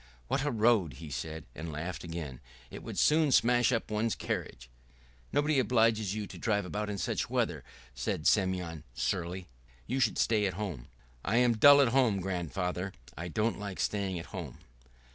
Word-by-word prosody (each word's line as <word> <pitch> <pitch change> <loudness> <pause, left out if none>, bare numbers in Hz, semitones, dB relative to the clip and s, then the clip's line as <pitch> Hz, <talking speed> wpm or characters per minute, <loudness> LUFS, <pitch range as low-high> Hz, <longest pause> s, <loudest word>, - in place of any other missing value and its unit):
"What 135 - +1
a 145 - +1
road!" 110 - +3
he 75 +3 -9
said, 80 +4 -5
and 80 +1 -6
laughed 85 +4 -5
again. 80 -6 -6 0.3
"It - - -8
would - - -7
soon 155 -1 +4
smash 120 0 +4
up 115 -3 -1
one's 110 +1 0
carriage." - - -4 0.6
"Nobody 145 -1 +2
obliges 110 -4 +2
you 105 -1 -3
to - - -10
drive 105 -4 0
about 105 +3 -3
in 100 - -3
such - - -2
weather," - - -1 0.3
said 65 +5 -3
Semyon 90 -6 +1
surlily. 90 0 -2 0.4
"You 130 +3 -1
should 120 -5 +2
stay 105 -3 +2
at 95 - -4
home." 90 - -5 0.4
"I 110 - 0
am 120 -1 +4
dull 145 +5 +8
at 135 - +4
home, 120 -5 +3
grandfather. 90 +1 -3 0.2
I 85 +3 -5
don't 110 +5 -1
like 100 -2 -6
staying 100 -3 -1
at 85 - -6
home." 85 -10 -6
100 Hz, 175 wpm, -31 LUFS, 85-115 Hz, 0.6 s, dull